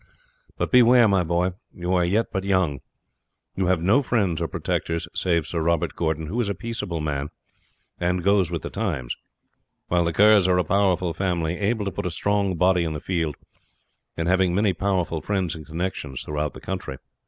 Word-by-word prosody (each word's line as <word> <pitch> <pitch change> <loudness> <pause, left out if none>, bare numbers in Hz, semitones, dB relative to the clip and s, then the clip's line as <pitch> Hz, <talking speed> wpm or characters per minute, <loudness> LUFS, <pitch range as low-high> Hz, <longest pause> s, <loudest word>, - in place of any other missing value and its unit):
But - - -2
beware, 125 -1 +6
my 95 -3 +3
boy; 85 +2 0 0.2
you 90 +1 -3
are 90 -1 +3
yet 100 +6 +1
but 95 -2 -2
young; 95 -8 +1 0.8
you 95 -2 0
have 90 -2 +1
no 105 +10 +4
friends 100 - 0
or - - 0
protectors, 85 0 -2
save 85 -3 +1
Sir 85 - -2
Robert 85 0 0
Gordon, 80 -1 -1
who 105 +10 -1
is 105 - -1
a 100 - -2
peaceable 105 -6 -4
man, 75 -1 -2 0.7
and 90 0 0
goes 100 -3 +3
with 85 -2 -4
the - - -5
times; 85 - -2 0.7
while 90 0 +3
the 85 - +1
Kerrs 105 +1 +5
are 90 -1 +3
a 90 - +3
powerful 90 -1 +1
family, 85 -2 -1
able 105 +1 0
to 100 - -2
put 90 - -3
a - - -1
strong 100 +2 0
body 90 +1 +3
in 80 -1 -2
the 75 - -4
field, 80 -5 -2 0.8
and 85 - -1
having 90 -1 +2
many 100 -1 +2
powerful 90 -3 -1
friends 95 -1 -1
and 80 -2 -9
connections 80 -5 -4
throughout 75 -1 -3
the - - -10
country. 65 - -5
90 Hz, 190 wpm, -24 LUFS, 80-100 Hz, 0.8 s, beware